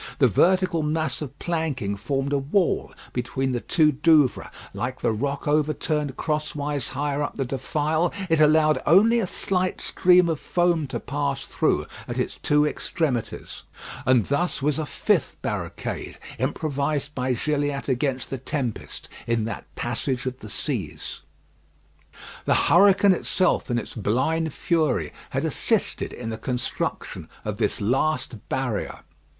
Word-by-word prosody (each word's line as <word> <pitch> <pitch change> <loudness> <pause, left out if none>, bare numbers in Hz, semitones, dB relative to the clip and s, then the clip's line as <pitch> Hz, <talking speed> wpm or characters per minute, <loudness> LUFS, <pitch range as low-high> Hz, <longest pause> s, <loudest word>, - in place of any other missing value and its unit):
The 140 - +5
vertical 180 - +3
mass 155 +1 -1
of 140 -1 -6
planking 150 - -2
formed 135 +7 -2
a 140 - +3
wall 165 +7 +1 0.2
between 130 +2 -1
the 120 -2 -1
two 155 -3 +3
Douvres; 150 -1 +3 0.2
like 125 +2 -3
the - - +2
rock 140 +7 -2
overturned 150 -1 0
crosswise 150 -3 -2
higher 145 0 0
up 145 - -2
the 135 - -1
defile, 150 +6 0 0.2
it 165 -3 +2
allowed 155 0 +5
only 220 +8 +6
a 205 - 0
slight 185 0 0
stream 180 -1 +4
of 160 -3 -1
foam 175 -4 +1
to - - -4
pass 140 -1 -2
through - - +1 0.2
at - - -4
its - - -2
two 150 0 +3
extremities, 145 -7 -2 0.4
and 125 -4 +4
thus 175 +6 0
was 150 +1 0
a 155 - -2
fifth 185 -6 0
barricade 90 -8 -4 0.2
improvised 145 0 -1
by 130 -2 0
Gilliatt 145 +2 -1
against 130 0 -1
the 135 - -3
tempest 130 -4 -4 0.2
in 115 -1 +1
that 110 -3 -5
passage 125 +2 -2
of 130 0 -3
the 110 - -9
seas. - - -3 1.2
The - - +3
hurricane 195 +2 +6
itself, 185 -2 +1
in 120 - +1
its - - -4
blind 135 +10 0
fury, 160 +1 0 0.2
had - - -1
assisted - - 0
in 115 -2 -5
the 110 - -5
construction 125 +1 -3 0.2
of - - -3
this - - 0
last 125 0 0
barrier. 125 -6 -2
145 Hz, 145 wpm, -25 LUFS, 130-160 Hz, 1.2 s, only